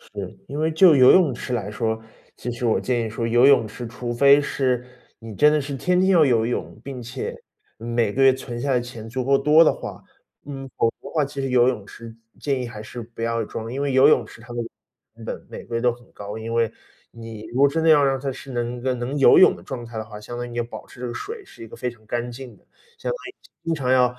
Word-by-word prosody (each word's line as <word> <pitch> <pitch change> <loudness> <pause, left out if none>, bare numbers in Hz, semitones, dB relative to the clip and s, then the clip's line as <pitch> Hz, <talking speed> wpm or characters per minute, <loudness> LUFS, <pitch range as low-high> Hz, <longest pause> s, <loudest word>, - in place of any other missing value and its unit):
是， 100 -3 -8
因 145 - -5
为 160 +1 +1
就 160 0 +6
游 130 -1 +8
泳 170 -8 +4
池 125 - -6
来 105 -5 -2
说， 110 0 -2 0.3
其 125 - -5
实 120 +1 -5
我 115 - +2
建 120 -2 0
议 110 - -4
说， 115 +1 -3
游 120 +2 +4
泳 135 -6 +5
池 120 +2 -7
除 120 +1 -5
非 140 +3 +6
是， 130 -3 -1 0.3
你 115 -2 -9
真 150 +7 +5
的 155 - +2
是 140 0 -5
天 180 +5 +1
天 190 +1 +3
要 170 -5 +6
游 115 -4 +2
泳， 85 -8 -4
并 135 -3 -7
且 125 +3 -5 0.4
每 115 -2 -1
个 135 - +1
月 135 0 +7
存 130 -2 -6
下 140 +2 0
的 125 - +2
钱 120 -2 -8
足 125 +2 -3
够 140 +1 +4
多 150 +4 +6
的 - - +4
话。 - - -8 0.4
嗯， 135 -2 -7
否 115 - +3
则 - - -9
的 - - -12
话， 155 - +3
其 140 - -9
实 135 - -2
游 125 0 +4
泳 105 -5 -2
池， 115 +2 -11 0.2
建 135 -3 -1
议 - - -4
还 110 -3 -8
是 120 +2 -8
不 115 0 -13
要 115 0 -1
装， 115 0 -6
因 135 +3 -3
为 140 -1 0
游 130 +2 +6
泳 125 -6 +4
池 110 - -14
它 120 +1 -10
的 120 - -2 0.5
成 - - -15
本， - - -6
每 - - -8
个 115 - -7
月 115 - -1
都 125 -1 +3
很 120 0 -17
高。 105 +2 -7
因 115 +1 -5
为 115 -2 +1 0.4
你 115 -2 -9
如 125 - -3
果 140 +1 +6
真 160 +3 -1
的 165 - +5
要 150 -2 +6
让 135 -1 +2
它 135 0 -3
是 135 - -11
能 120 0 -3 0.2
能 130 +4 -3
游 135 - +7
泳 - - +7
的 - - -13
状 120 - -6
态 115 -1 -7
的 110 - -4
话， 105 -1 -10
相 120 +3 -8
当 120 - -4
于 - - -10
你 120 - -9
要 120 - 0
保 115 - -10
持 - - -17
这 125 - -4
个 120 - -4
水 440 - -7
是 385 - -14
一 115 - -9
个 - - -11
非 125 - -3
常 115 -2 -19
干 120 +2 -3
净 125 -1 -10
的， - - -28 0.3
相 475 - -4
当 - - -4
于 380 - -11 0.3
经 165 - +1
常 130 -4 0
要， 130 -1 +5
120 Hz, 300 characters per minute, -23 LUFS, 115-140 Hz, 0.5 s, 游